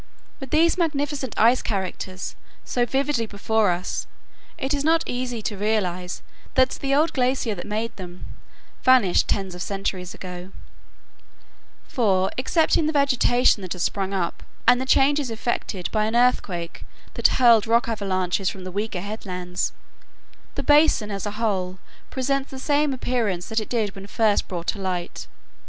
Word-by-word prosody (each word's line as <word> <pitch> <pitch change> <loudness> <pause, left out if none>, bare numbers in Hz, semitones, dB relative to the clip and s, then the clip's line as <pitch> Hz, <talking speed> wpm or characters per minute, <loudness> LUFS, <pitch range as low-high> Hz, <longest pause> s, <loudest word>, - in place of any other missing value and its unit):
With 270 -3 -7
these 330 +5 +3
magnificent 290 -5 -1
ice 235 +3 +5
characters 190 -2 -4 0.3
so 245 -1 0
vividly 265 -2 0
before 215 0 +1
us 175 +1 -2 0.5
it 265 +2 -1
is 285 -1 -1
not 325 +2 +3
easy 245 -2 -3
to 205 - -2
realize 190 -4 -1 0.3
that 260 0 +4
the 275 0 -1
old 310 +3 +2
glacier 255 -3 +1
that 180 -1 -7
made 220 +2 -3
them 180 -2 -8 0.6
vanished 250 -9 +4
tens 195 -2 -1
of 180 - -8
centuries 195 -2 -3
ago; 180 0 -8 1.4
for, 190 -6 +1
excepting 315 +4 +2
the - - +1
vegetation 255 -5 +3
that 185 -2 -4
has 180 -1 -3
sprung 195 -1 -1
up, 185 -3 -2 0.2
and 245 0 +5
the 260 - -4
changes 280 0 +3
effected 225 -5 -3
by 215 -1 +1
an 220 +2 -1
earthquake 195 -9 +1 0.3
that - - +4
hurled 230 -4 +6
rock 230 +1 +3
avalanches 190 -3 0
from 190 - -8
the 185 - -6
weaker 200 -1 -3
headlands, 180 -3 -3 0.8
the - - -3
basin 290 -8 +4
as 200 +1 -3
a - - -3
whole 190 -5 -1 0.3
presents 275 +1 -1
the 265 - -8
same 290 +2 +1
appearance 230 -8 -1
that 220 0 +1
it 215 - -6
did 220 -5 0
when 195 0 -10
first 215 +1 +2
brought 175 -2 -5
to 200 - -2
light. 180 -2 -4
220 Hz, 155 wpm, -24 LUFS, 190-260 Hz, 1.4 s, hurled